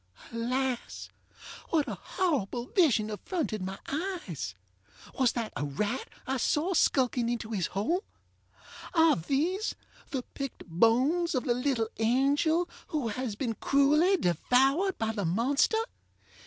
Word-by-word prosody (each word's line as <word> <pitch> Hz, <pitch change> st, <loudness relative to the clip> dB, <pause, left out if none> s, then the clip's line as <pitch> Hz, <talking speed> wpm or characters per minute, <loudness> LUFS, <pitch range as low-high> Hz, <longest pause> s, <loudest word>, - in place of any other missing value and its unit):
Alas! 250 Hz, +2 st, -2 dB, 0.6 s
what 310 Hz, -4 st, +2 dB
a -, -, -3 dB
horrible 265 Hz, -, -1 dB
vision 250 Hz, -, +2 dB
affronted 215 Hz, -, -3 dB
my 190 Hz, +1 st, -4 dB
eyes? 300 Hz, -, -4 dB, 0.6 s
Was 255 Hz, -3 st, +4 dB
that 230 Hz, -2 st, -3 dB
a -, -, -2 dB
rat 205 Hz, -, -2 dB, 0.2 s
I 265 Hz, +1 st, -1 dB
saw 300 Hz, +9 st, +1 dB
skulking 250 Hz, -7 st, +2 dB
into 230 Hz, -2 st, -3 dB
his 190 Hz, -6 st, 0 dB
hole? 320 Hz, -, -1 dB, 0.9 s
Are 325 Hz, -1 st, +6 dB
these 315 Hz, -, -1 dB, 0.3 s
the 265 Hz, -3 st, -3 dB
picked 275 Hz, -3 st, -6 dB
bones 255 Hz, -, +2 dB
of 255 Hz, -, 0 dB
the 245 Hz, -, +2 dB
little 250 Hz, -3 st, 0 dB
angel 285 Hz, +9 st, +2 dB, 0.2 s
who 290 Hz, -7 st, -1 dB
has 235 Hz, -1 st, -3 dB
been 230 Hz, 0 st, -2 dB
cruelly 300 Hz, -, +3 dB
devoured 270 Hz, -, +2 dB
by 220 Hz, 0 st, 0 dB
the 210 Hz, -2 st, -3 dB
monster? 240 Hz, -, +2 dB
255 Hz, 130 wpm, -29 LUFS, 225-310 Hz, 0.9 s, Are